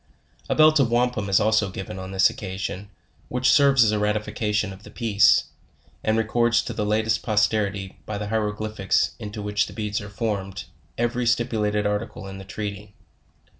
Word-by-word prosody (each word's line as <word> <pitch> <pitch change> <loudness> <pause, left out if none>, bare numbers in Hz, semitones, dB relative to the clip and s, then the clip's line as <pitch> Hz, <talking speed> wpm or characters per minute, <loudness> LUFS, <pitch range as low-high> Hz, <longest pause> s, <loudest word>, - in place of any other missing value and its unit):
A - - +1
belt 155 0 +6
of 130 -4 +3
wampum 120 -4 0
is 95 - +4
also 110 -1 +2
given 95 0 -7
on 95 0 -7
this 95 0 +4
occasion, 95 0 -5 0.4
which 125 0 +2
serves 140 -4 +5
as 110 - +3
a 105 - 0
ratification 105 -1 -1
of 95 - -13
the - - -13
peace, 110 -4 +4 0.6
and 110 0 +1
records 115 +1 +2
to - - -5
the 105 - -2
latest 110 +1 +1
posterity, 105 -3 0
by 105 - -3
the 105 0 -4
hieroglyphics 105 -2 0
into 105 0 -6
which 105 +1 0
the 100 - -10
beds 105 -1 -3
are 100 - -8
form 100 -1 -2
ed, 100 - -6 0.3
every 120 +1 0
stipulated 105 -3 +1
article 105 0 -3
in 95 0 -8
the 95 - -10
treaty. 105 0 -6
105 Hz, 175 wpm, -24 LUFS, 100-115 Hz, 0.6 s, belt